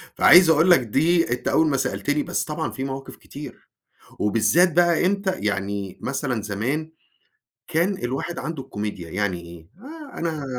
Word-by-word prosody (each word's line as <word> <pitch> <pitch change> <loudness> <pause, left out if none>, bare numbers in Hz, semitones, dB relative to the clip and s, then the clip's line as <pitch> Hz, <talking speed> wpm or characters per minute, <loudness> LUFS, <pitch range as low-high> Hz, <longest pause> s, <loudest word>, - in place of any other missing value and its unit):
فعايز 175 -1 +7
أقول 160 +3 +5
لك 155 - +7
دي 155 +6 +1
أنت 125 0 -2
أول 160 0 +3
ما 140 -2 +1
سألتني، 145 +2 -1
بس 175 - -2
طبعًا 160 +1 -4
فيه 130 - -5
مواقف 135 0 -6
كتير 145 +1 -11 0.5
وبالذات 140 - +3
بقى 175 0 +3
إمتى 195 0 +1
يعني 100 -2 -3
مثلًا 130 -4 -2
زمان، 125 +10 -3 0.8
كان 180 +5 0
الواحد 135 +7 -3
عنده 140 -1 -5
الكوميديا، 105 -5 -6
يعني 90 -2 -2
إيه؟ 85 -1 -13
آآ 300 +1 -11
أنا 155 -4 -3
145 Hz, 155 wpm, -23 LUFS, 105-170 Hz, 0.8 s, فعايز